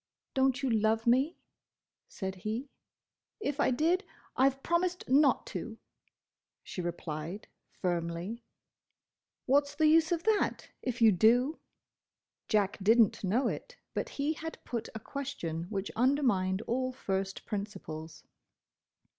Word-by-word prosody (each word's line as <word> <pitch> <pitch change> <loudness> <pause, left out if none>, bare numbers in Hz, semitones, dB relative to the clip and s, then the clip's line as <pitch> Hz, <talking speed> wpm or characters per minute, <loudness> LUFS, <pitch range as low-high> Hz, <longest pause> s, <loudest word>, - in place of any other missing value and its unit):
"Don't 265 0 +2
you 265 - +2
love 220 0 +2
me?" 265 +8 +3 0.7
said 190 -2 -5
he. 220 +8 -4 0.7
"If 290 -8 -2
I - - +4
did, 330 +9 +2 0.3
I 265 +1 +5
've 270 0 -11
promised 355 +1 0
not 275 +2 +4
to!" - - -5 0.9
she 180 - -5
replied 170 +2 -5 0.2
firmly. 175 +5 -3 1.0
"What 285 +2 +4
's - - -10
the 315 - +3
use 320 +1 +5
of 340 -1 0
that, 435 -2 +1
if 245 -2 -1
you 220 - +8
do?" 240 - +4 0.9
Jack 205 -2 +1
did 225 +5 +5
n't 220 -3 +4
know 220 +8 +2
it, - - -5 0.2
but - - -2
he 290 +2 +1
had 320 +1 -6
put 235 -3 -4
a - - -3
question 205 - -4
which 195 +1 -4
undermined 225 -7 +2
all 255 +2 -1
first 195 -6 -3
principles. 165 -7 -6
235 Hz, 130 wpm, -31 LUFS, 195-280 Hz, 1.0 s, you